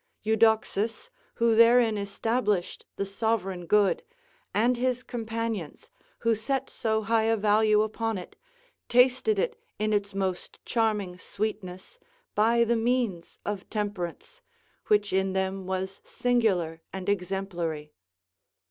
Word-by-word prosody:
Euxodus, 220 - +1 0.2
who 230 -1 +3
therein 230 0 +6
established 205 -1 -1
the 200 - -2
sovereign 195 -3 -2
good, 210 - +3 0.5
and 235 +4 +2
his 250 0 0
companions, 225 - -4 0.3
who 230 0 +3
set 265 +5 -2
so 220 -2 0
high 225 +1 +2
a 225 0 +2
value 215 0 +4
upon 225 0 -2
it, 180 - -9 0.5
tasted 255 - +4
it 465 +2 -1 0.2
in 215 0 0
its 200 -1 -1
most 190 -2 -3
charming 210 -6 0
sweetness, 205 - -5 0.3
by 230 +3 +4
the 235 +1 +2
means 230 -6 -1
of 205 -2 -4
temperance, 205 - -4 0.5
which 205 -2 +2
in 190 0 +1
them 190 0 -2
was 190 +1 -3
singular 195 -10 0
and 190 0 -6
exemplary. 175 -6 -2
215 Hz, 120 wpm, -27 LUFS, 190-230 Hz, 0.5 s, therein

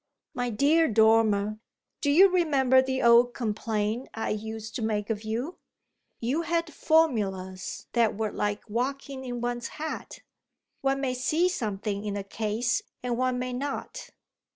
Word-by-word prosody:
"My 245 -3 -2
dear 295 +8 +3
Dormer, 215 -1 +3 0.4
do 285 - +1
you 355 +7 +8
remember 275 -8 +4
the 260 0 -2
old 240 +1 +6
complaint 220 +1 -2
I 225 - -2
used 220 +1 -5
to - - -5
make 215 -1 -1
of 215 -1 -2
you? 235 +10 -3 0.6
You 260 +8 0
had 335 -1 -1
formulas 200 - 0
that 230 -4 +2
were 215 -1 -1
like 205 +1 -2
walking 265 +4 -3
in 245 -2 -5
one's 240 0 -2
hat. 315 +1 -6 0.6
One 270 0 +1
may 260 -2 0
see 310 +8 +1
something 210 - -3
in 205 -1 -3
a 200 - -3
case 220 +4 -1 0.2
and 245 -1 -1
one 255 +1 0
may 250 0 -3
not." 275 +3 -5
240 Hz, 150 wpm, -27 LUFS, 215-270 Hz, 0.6 s, you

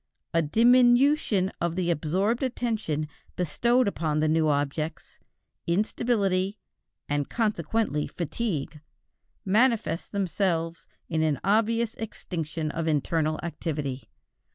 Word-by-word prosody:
A 165 - +4
diminution 240 - +4
of 170 -1 0
the 180 -2 +1
absorbed 185 +9 0
attention 220 - -1 0.3
bestowed 235 +9 +2
upon 155 -6 -1
the 155 - +2
new 155 0 +2
objects, 150 +2 -2 0.5
instability, 200 0 +1 0.5
and 145 -1 -1
consequently 210 -6 0
fatigue, 160 -4 -3 0.6
manifest 210 -5 +2
themselves 175 -4 -1 0.2
in 160 -1 0
an 155 -4 +1
obvious 225 +2 +2
extinction 160 -8 -4
of 165 +1 -3
internal 155 +1 0
activity. 145 -6 -4
170 Hz, 100 wpm, -27 LUFS, 155-220 Hz, 0.6 s, A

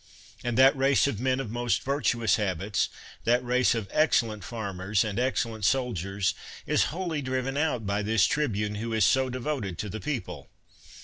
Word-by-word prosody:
And 120 -1 -1
that 135 +1 +7
race 135 0 +3
of 140 -7 -1
men 130 +1 +1
of 115 -6 -4
most 120 -3 0
virtuous 120 -6 +1
habits, 100 -1 -1 0.3
that 120 +2 +2
race 125 0 +3
of 110 -4 -3
excellent 115 - +2
farmers 100 -1 -1
and 105 0 -3
excellent 115 -4 -1
soldiers, 100 -5 0 0.3
is - - +2
wholly 165 -3 -3
driven 130 0 -2
out 145 -7 0
by 100 +1 0
this 105 -1 +3
tribune 105 -8 0
who 115 0 -3
is 110 -3 +3
so 130 +3 +3
devoted 125 - -3
to 105 - -4
the 110 - -5
people. 100 - -5
115 Hz, 170 wpm, -27 LUFS, 105-130 Hz, 0.3 s, that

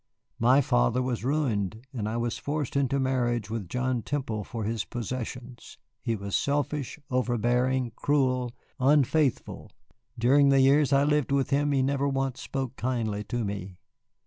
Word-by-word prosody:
My 125 +5 +5
father - - +2
was 125 -3 -2
ruined, 120 -6 -1
and 110 -4 -2
I 115 - -2
was 120 0 -2
forced 145 -2 -3
into 140 0 +1
marriage 120 -4 0
with 110 -6 -4
John 125 +1 -1
Temple 115 -6 -3
for 115 +1 -5
his 110 0 -1
possessions. 125 +1 -6 0.2
He 115 - -1
was 100 -1 -4
selfish, 145 -1 -1
overbearing, 125 0 +1
cruel 130 -4 +1 0.3
unfaithful. 140 0 +1 0.5
During 140 +4 +4
the 135 0 +5
years 140 +2 +4
I 140 0 +4
lived 150 -2 +1
with 140 0 +1
him 145 +1 +2
he 135 -2 +2
never 140 +1 +1
once 135 -2 -1
spoke 130 -2 -4
kindly 115 -5 -2
to 120 -3 -2
me. 100 -2 -5
125 Hz, 150 wpm, -27 LUFS, 115-140 Hz, 0.5 s, My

